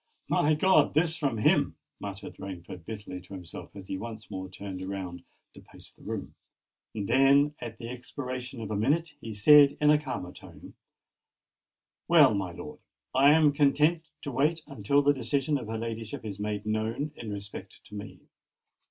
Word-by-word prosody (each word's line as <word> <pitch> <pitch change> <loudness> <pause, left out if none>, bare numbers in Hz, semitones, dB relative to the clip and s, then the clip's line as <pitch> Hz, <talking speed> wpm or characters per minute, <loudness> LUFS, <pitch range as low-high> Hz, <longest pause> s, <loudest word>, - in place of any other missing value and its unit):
"My 150 +1 +3
God! 155 -3 +4
this 160 +1 +3
from 140 -8 -1
him!" 105 - +3 0.2
muttered 100 -1 -7
Rainford 90 -3 -8
bitterly 105 -4 -7
to 95 +2 -10
himself, 90 +1 -9
as 95 -1 -9
he 95 - -4
once 110 -1 -8
more 95 -1 -5
turned 95 0 -7
round 90 -3 -5 0.3
to - - -13
pace - - -13
the - - -23
room: - - -5 0.6
then, 135 +7 +4
at 115 -2 -7
the 115 - -7
expiration 125 0 -6
of 110 -1 -5
a - - -1
minute, 150 +9 +1
he 115 - -6
said 140 +7 +7
in 150 0 +5
a 150 - +5
calmer 90 -11 -5
tone, - - -13 1.3
"Well, 150 -8 +7
my 95 -3 -2
lord—I 130 +9 -1
am 155 -2 +5
content 150 +3 +3 0.2
to 145 - -4
wait 155 +5 +1
until 140 +3 +1
the 145 +1 +5
decision 140 +1 0
of 120 - -8
her 110 0 -3
ladyship 115 -1 -5
is 100 -2 -6
made 105 0 -3
known 110 +7 -1
in 110 -3 -7
respect 100 -1 -8
to - - -17
me. 105 0 -8
115 Hz, 170 wpm, -28 LUFS, 100-145 Hz, 1.3 s, said